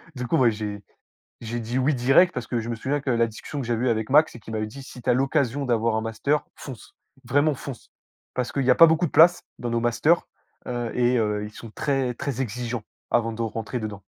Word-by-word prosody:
Du 125 -1 -4
coup, 165 - +2
bah, 125 -4 +5
j'ai 105 -2 -4 0.6
j'ai 120 +1 -4
dit 120 +3 -3
oui 140 +2 +2
direct 135 +9 +4
parce - - -5
que 120 - -1
je 115 - -5
me 115 - -2
souviens 140 +6 -1
que 140 - -4
la 115 -1 +3
discussion 135 +6 -6
que 120 - -6
j'avais 120 +1 0
eue - - +3
avec 110 0 -1
Max 150 -1 +4
et - - -9
qu'il 110 0 -10
m'avait 110 0 -2
dit: 135 +5 -10
«Si 125 - -11
tu - - -2
as - - +6
l'occasion 135 0 0
d'avoir 115 -2 +1
un 110 - 0
master, 140 +7 -1
fonce, 130 -6 -10 0.3
vraiment 145 +4 +2
fonce», 130 -2 -9 0.4
parce 125 -1 -2
qu'il 140 - -1
y 130 - +5
a - - +5
pas 165 - +9
beaucoup 160 +2 +2
de - - -4
places 175 +2 +6 0.2
dans 120 - -3
nos 115 0 0
masters, 120 +8 +2 0.4
heu 120 -2 -3
et 125 0 +3
heu, 105 -1 0
ils 105 - -9
sont 115 -1 -10
très, 135 -3 -1
très 140 -5 -3
exigeants 120 -1 -4 0.3
avant 115 -1 +2
de 115 - -5
rentrer 115 +2 -3
dedans. 105 -2 -6
120 Hz, 245 wpm, -24 LUFS, 115-140 Hz, 0.6 s, pas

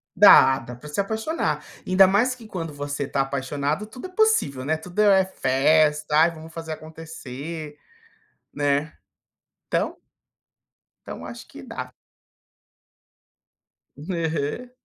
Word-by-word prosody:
Dá, 135 0 +8
dá 125 +1 -9
pra 135 +5 -12
se 150 - -4
apaixonar. 220 +11 -1 0.2
Ainda 185 +1 +6
mais 225 +7 +2
que 235 -3 -13
quando 165 -6 -5
você 145 0 -4
está 140 0 -1
apaixonado 140 +6 -2
tudo 250 +10 -9
é - - -16
possível, 370 - +2
né, 155 +3 +1
tudo 180 +5 -8
é 195 -2 +5
festa, 150 -1 +2
ai 165 +2 +5
vamos 160 0 -12
fazer 160 -1 -5
acontecer, 155 -1 -8 0.8
né. 145 +1 0 0.7
Então - - -1 1.1
então - - -7
acho - - -9
que - - -12
dá. - - -7 2.0
Aham. 160 - -3
160 Hz, 120 wpm, -24 LUFS, 145-190 Hz, 2.0 s, Dá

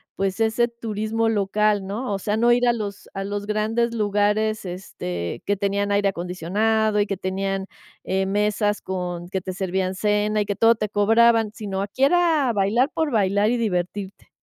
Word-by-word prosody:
pues, 195 +1 -2
ese 225 +2 +2
turismo 225 -1 -2
local, 205 -1 +1
¿no? 210 +4 -4
O - - 0
sea, 210 +2 -1
no 235 +2 +3
ir 245 +1 +3
a 240 - +4
los 205 -3 -6
a 195 0 -4
los 205 0 -4
grandes 220 +3 0
lugares, 210 0 0
este, 90 - -5
que 205 - +1
tenían 200 +1 -1
aire 200 0 +2
acondicionado 205 +5 0
y 205 - +3
que 200 - -3
tenían, 195 +1 -2 0.4
eh, 190 +1 0
mesas 210 +1 0
con 175 -2 -4
que 190 - -2
te 185 +1 -5
servían 190 0 -1
cena 210 +2 +1
y 205 - -1
que 205 - -1
todo 230 +3 +5
te 215 -1 -3
cobraban, 225 +2 +4
sino 195 -3 -4
aquí 205 +6 -3
era 325 -5 +3
bailar 215 +7 +2
por 315 -2 -1
bailar 205 0 +2
y 245 - +1
divertirte. 195 -2 -3
205 Hz, 180 wpm, -23 LUFS, 195-220 Hz, 0.4 s, todo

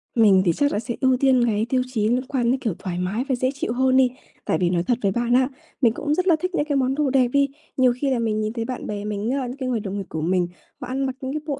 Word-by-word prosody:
Mình 205 -5 +5
thì 170 - +4
chắc 285 - +1
là - - 0
sẽ 235 +1 -4
ưu 260 -1 +3
tiên 260 -2 +3
cái 220 -1 +1
tiêu 255 0 +2
chí 220 -4 0
liên 250 +2 0
quan 245 -4 +1
đến, 260 - 0
kiểu, 225 -7 -1
thoải 180 -2 -4
mái 195 +7 -1
và 260 - +2
dễ 255 +1 0
chịu 250 -4 -3
hơn 260 +1 +3
đi. 260 -1 +5 0.4
Tại - - +1
vì 175 - +3
nói 175 -1 +1
thật 245 +4 +1
với 200 - +1
bạn 240 +3 0
á, 255 +1 +4 0.3
mình 235 -4 +4
cũng 295 +4 -1
rất 365 +4 0
là 345 - +6
thích 365 +1 -3
những 295 - +1
cái 295 -2 -1
món 265 0 +1
đồ 295 -1 +1
đẹp 260 -2 +3
đi. 280 +3 +2 0.3
Nhiều 255 -2 +4
khi 280 - +1
là 255 - +1
mình 220 -2 0
nhìn 215 +1 -2
thấy 230 -1 -3
bạn 255 0 -5
bè 205 -1 -4
mình 210 +1 -2
á, 265 -2 -1
những 250 +3 -7
cái 260 -2 -3
người 240 -3 0
đồng 200 -1 -5
nghiệp 195 - -4
của 160 - -4
mình, 180 +2 +1 0.3
họ - - -5
ăn 270 +2 -1
mặc 260 -1 -3
những 265 0 -4
cái 305 - -3
bộ 285 -3 -3
250 Hz, 320 wpm, -23 LUFS, 215-265 Hz, 0.4 s, là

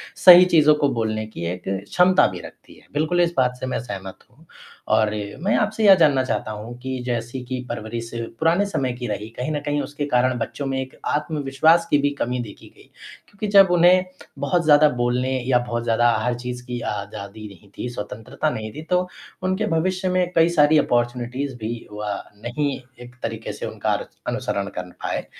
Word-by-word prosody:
सही 180 0 +9
चीज़ों 155 -4 +5
को 145 -1 +1
बोलने 110 -1 -1
की 85 -6 -7
एक 90 - -10
क्षमता 100 - +3
भी 90 -1 -6
रखती - - -13
है - - -24
बिल्कुल 155 +4 +1
इस 170 0 +1
बात 125 -1 +2
से - - -4
मैं - - -1
सहमत 95 -5 -7
हूँ 150 +7 -23 0.5
और 110 -1 +3 0.3
मैं 195 +6 +1
आपसे 215 +1 0
ये 195 - +10
जानना 145 -6 +4
चाहता 130 -4 -2
हूँ 110 +3 -7
कि 130 0 -4
जैसे 120 +1 -3
कि 130 +1 -4
परवरिश 115 +1 -5 0.3
पुराने 170 +5 +3
समय 135 -11 -2
की 120 0 -6
रही 105 0 -4
कहीं 125 +5 -2
न 150 - -1
कहीं 145 0 0
उसके 145 0 -4
कारण 125 0 +3
बच्चों 140 +4 -4
में 135 0 -1
एक 130 0 -5
आत्मविश्वास 150 +2 +2
की - - +4
भी 145 - +2
कमी 125 +1 -1
देखी 105 -3 -12
गई - - -17 0.4
क्योंकि 205 +1 -5
जब 195 -1 +9
उन्हें 180 +1 +5 0.4
बहुत 175 -1 +1
ज़्यादा 150 0 +6
बोलने 125 +2 0 0.2
या 125 -2 +4
बहुत 120 0 -2
ज़्यादा 120 +1 +3
हर 125 - +1
चीज़ 125 0 -6
की 125 -1 -4
आज़ादी 100 +1 -7
नहीं 100 0 -16
थी, 125 - -4
स्वतंत्रता 115 +5 -4
नहीं 110 -6 -5
थी 155 - -6
तो 180 0 +2 0.4
उनके 190 +3 0
भविष्य 185 +3 0
में 180 -1 +1
कई 165 0 +5
सारी 150 +1 +6
अपॉर्च्युनिटीज़ 125 +2 -1
भी 115 +1 -5
व 105 -1 -4 0.2
नहीं 140 +4 -2 0.3
एक 120 +1 -15
तरीक़े 115 -1 -4
से - - -6
उनका - - -2 0.3
अनुसरण 100 0 -2
कर 90 0 -5
पाए, - - -2
130 Hz, 190 wpm, -22 LUFS, 115-160 Hz, 0.5 s, ये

